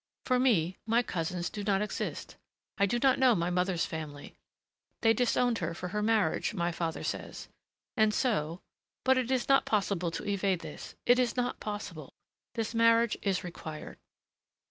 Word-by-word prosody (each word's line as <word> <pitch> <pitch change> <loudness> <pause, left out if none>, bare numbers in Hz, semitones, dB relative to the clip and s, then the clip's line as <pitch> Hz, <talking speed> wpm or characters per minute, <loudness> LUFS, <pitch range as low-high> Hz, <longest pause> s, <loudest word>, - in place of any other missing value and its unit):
For 255 -1 +2
me, 190 -9 +2
my 230 +2 +3
cousins 175 -2 -3
do 205 - -5
not 200 0 +2
exist. 210 - -4 0.4
I 200 - +4
do 240 - 0
not 260 +1 +3
know 255 -3 +5
my 170 +1 0
mother's 180 -1 +1
family. 150 -3 -7 0.7
They 225 0 +5
disowned 245 -1 +2
her 170 -2 -3
for 180 +1 -5
her 210 +3 -2
marriage, 215 -3 +1
my 175 -2 0
father 165 -1 -3
says. - - -5 0.5
And 215 -1 +4
so 185 - 0 0.4
but 260 0 +4
it 250 -1 -2
is 260 -2 +1
not 275 0 +5
possible 195 -4 0
to 170 - -5
evade 195 -3 0
this.... - - -9
It 245 +1 +5
is 250 0 +1
not 245 0 -1
possible. 205 -8 -6 0.4
This 225 -1 -2
marriage 230 0 +4
is 195 -2 0
required." 160 -3 -8
205 Hz, 165 wpm, -30 LUFS, 175-235 Hz, 0.7 s, know